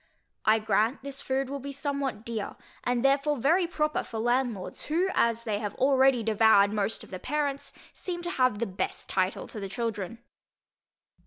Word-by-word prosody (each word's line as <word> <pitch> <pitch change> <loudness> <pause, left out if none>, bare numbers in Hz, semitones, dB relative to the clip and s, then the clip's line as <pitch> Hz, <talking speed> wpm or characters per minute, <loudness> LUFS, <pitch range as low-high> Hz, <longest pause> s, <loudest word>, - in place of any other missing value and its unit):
I 215 +1 +5
grant 220 +4 +1
this 275 -1 -4
food 265 0 -1
will 280 +1 -4
be 280 +1 -6
somewhat 275 -5 -3
dear, 225 -3 -4 0.3
and 245 +1 0
therefore 280 +2 +3
very 335 +8 +3
proper 305 -2 0
for 225 - -7
landlords, 240 -3 -1
who, 345 +5 +1
as 230 0 +2
they 215 -3 -1
have 205 -2 -4
already 265 -2 +4
devoured 215 -2 +5
most 210 +1 -1
of - - -14
the 185 - -5
parents, 285 +2 -2 0.2
seem 345 -2 -5
to 350 - -1
have 255 -7 +2
the 235 - -1
best 190 -2 -4
title 185 0 0
to 215 - -7
the 195 -1 -5
children. 225 -1 -3
245 Hz, 175 wpm, -28 LUFS, 215-280 Hz, 0.3 s, I